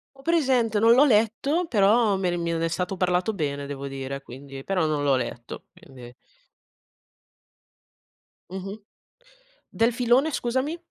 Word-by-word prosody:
Ho 270 - -17
presente, 260 -9 +1
non 225 +2 +5
l'ho 265 +4 +6
letto, 265 +8 +1
però 210 0 +3
me 190 -2 -1
ne 175 - -1
mi 170 -1 -2
ne 165 0 -1
è - - +1
stato 180 +3 -3
parlato 180 +3 0
bene 145 -6 -3
devo 140 -1 -6
dire, 135 0 -6
quindi 135 +1 -10
però 185 -4 0
non 150 -2 -1
l'ho 140 -2 +3
letto, 120 -2 -6
quindi. 135 -10 -14 2.4
Mh-mh. 195 +3 -7 0.9
Del 230 +1 +1
filone 250 +5 +2
scusami? 260 +5 -2
190 Hz, 145 wpm, -25 LUFS, 145-240 Hz, 2.4 s, l'ho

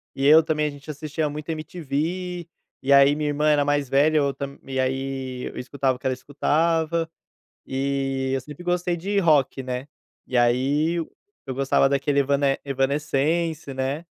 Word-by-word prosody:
e 135 - -1
eu 155 +2 +8
também. 150 -1 0
A - - -1
gente 145 +1 -12
assistia 150 +1 -3
muito 150 +2 -7
MTV, 170 +3 -3 0.3
e 140 +1 +3
aí 140 +1 +6
minha 150 -1 -1
irmã 150 +1 +1
era 145 -1 +3
mais 145 -2 0
velha, 150 +3 +4
eu 140 -2 +2
tam 140 0 -6 0.2
aí 130 -1 -2
escutava 135 0 -1
o - - -30
que - - -18
ela 130 - +1
escutava, 160 +4 0 0.6
e 135 0 -1
eu 135 - 0
sempre 150 +5 -11
gostei 175 0 0
de 200 +4 0
rock, 150 -7 +3
né. 125 +2 -4 0.4
E 125 - -1
aí 135 +7 +2
eu 165 - -7
gostava 135 0 +3
daquele 140 +1 +1
Evane 140 0 +2
Evanescence, 145 +3 0
né. 135 +5 -2
145 Hz, 160 wpm, -24 LUFS, 135-155 Hz, 0.6 s, eu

